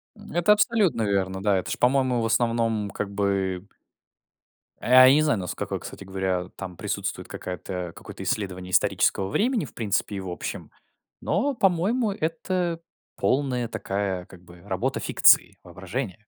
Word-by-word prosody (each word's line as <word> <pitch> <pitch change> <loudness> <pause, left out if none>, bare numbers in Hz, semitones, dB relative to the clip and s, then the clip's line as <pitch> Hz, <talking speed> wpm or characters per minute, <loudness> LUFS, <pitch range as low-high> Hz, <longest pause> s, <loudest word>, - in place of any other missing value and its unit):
М, 210 0 -13
это 175 +5 +5
абсолютно 210 - +2
верно. 95 -2 -1
Да, 100 -1 +2
это 90 - -3
ж, - - -2
по-моему, 130 -1 +2
в - - 0
основном 115 -2 +1
как 100 0 -4
бы 100 -2 -1 1.1
а, 130 +1 +7
я 130 - +7
не 150 - +4
знаю, 150 -8 +2
наско 90 -2 -4
кстати - - -9
говоря, 95 -2 -2
там 95 -2 -7
присутствует - - -4
какая-то 90 -1 -6
какое-то - - -9
исследование 95 -3 -3
исторического 95 0 +2
времени, 225 - +1
в - - -13
принципе, 105 -2 -1
и - - -3
в 95 -1 -6
общем. 90 - -6 0.5
Но, 280 0 0
по-моему, 200 +4 +2
это 170 0 -2 0.4
полная 125 -3 0
такая, 95 -4 -3
как 90 -1 -15
бы 85 0 -16
работа - - -2
фикции, - - +4
воображения. 100 +3 -5
105 Hz, 150 wpm, -25 LUFS, 95-150 Hz, 1.1 s, а